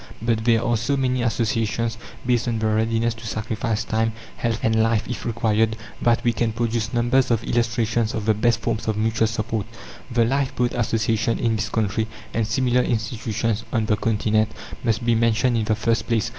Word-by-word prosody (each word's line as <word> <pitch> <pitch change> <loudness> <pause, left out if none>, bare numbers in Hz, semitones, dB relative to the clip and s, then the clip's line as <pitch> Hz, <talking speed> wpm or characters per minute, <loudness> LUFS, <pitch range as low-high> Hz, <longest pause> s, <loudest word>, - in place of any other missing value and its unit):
But 115 -1 0
there 115 -1 +4
are 120 0 +1
so 130 +5 0
many 130 -1 +1
associations 115 -1 0 0.3
based 120 -1 +1
on 115 -1 0
the 110 - -1
readiness 110 +1 +1
to 115 0 -9
sacrifice 110 +1 -2
time, 110 +1 0 0.2
health, 115 -1 -1
and 110 0 +3
life 115 -1 +1
if 125 - -4
required, 110 -1 +1 0.2
that 120 0 +2
we 120 -2 +2
can 115 -2 0
produce 115 -1 -1
numbers 125 +2 +2
of 115 -2 +1
illustrations 115 -1 0
of 110 - -3
the 110 - +4
best 115 +2 +1
forms 115 -1 -2
of 110 -1 0
mutual 110 +1 +2
support. 110 -1 -2 0.4
The 120 -2 +2
Lifeboat 125 -1 0
Association 115 -1 0
in 115 -1 +1
this 110 -1 -2
country, 110 0 0 0.3
and 110 -1 0
similar 125 +2 +2
institutions 115 -1 -1
on 115 -3 +1
the 105 - +2
Continent, 110 0 +1 0.3
must 115 0 0
be 120 - +4
mentioned 115 +2 +2
in 110 -2 +1
the 110 - +1
first 115 +2 0
place. 115 0 +1
115 Hz, 185 wpm, -23 LUFS, 110-120 Hz, 0.4 s, there